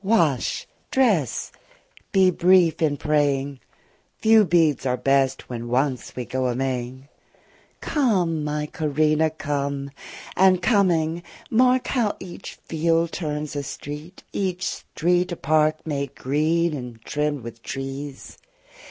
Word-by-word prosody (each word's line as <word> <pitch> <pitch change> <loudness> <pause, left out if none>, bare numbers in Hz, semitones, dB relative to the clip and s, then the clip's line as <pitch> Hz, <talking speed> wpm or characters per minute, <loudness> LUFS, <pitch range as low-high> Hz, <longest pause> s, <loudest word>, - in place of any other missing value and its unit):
Wash, 170 - +1 0.2
dress, 210 - +1 0.6
be 190 -1 +5
brief 180 -2 +4
in 150 -3 +2
praying: 140 -2 0 0.6
Few 220 0 +5
beads 165 -5 +3
are 125 -1 0
best 135 -1 +1
when 120 -1 -5
once 130 +1 -1
we 125 - -4
go 130 +1 -1
a 120 - -1
Maying. 130 0 -3 0.7
Come, 185 - +1
my 150 0 -2
Corinna, 155 0 +1
come; 140 -2 -3 0.4
and 185 -1 +5
coming, 175 -5 +2 0.3
mark 250 +2 +4
How 235 -6 +1
each 180 -2 -9
field 165 +1 +1
turns 150 -3 -4
a 145 - -1
street, 150 +5 -8
each 185 -2 -2
street 175 +2 0
a - - -3
park, 155 +1 +2
30 - - -7
Made 140 -2 -3
green 155 +5 +1
and 125 -5 -7
trimm'd 150 -3 -1
with 115 0 -9
trees! 135 +2 -6
150 Hz, 125 wpm, -23 LUFS, 140-175 Hz, 0.7 s, be